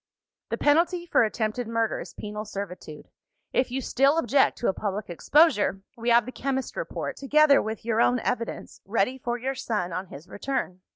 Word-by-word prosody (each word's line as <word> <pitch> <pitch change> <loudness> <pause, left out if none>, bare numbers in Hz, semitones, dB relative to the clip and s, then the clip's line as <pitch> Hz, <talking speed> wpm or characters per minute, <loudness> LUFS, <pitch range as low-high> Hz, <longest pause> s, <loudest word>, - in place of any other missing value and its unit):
"The - - -2
penalty 340 +4 +2
for 345 - +3
attempted 220 +2 -2
murder 230 -1 0
is - - -9
penal 210 0 -5
servitude. 190 -7 -8 0.4
If 255 - +2
you 260 +2 -2
still 275 +4 +2
object 275 -3 +3
to - - -1
a - - +2
public 200 -2 -4
exposure, 210 - +3
we 235 +1 -2
have 235 -1 +5
the 255 - -6
chemist's 265 0 -3
report, - - -4
together 290 +1 +5
with 220 0 -5
your 230 0 +2
own 250 - +4
evidence, 230 -2 -4
ready 230 +5 0
for 240 -1 -2
your 260 +3 -2
son 215 -9 -3
on 185 +2 -4
his 155 +1 -11
return. 225 -7 -3
235 Hz, 180 wpm, -26 LUFS, 210-270 Hz, 0.4 s, have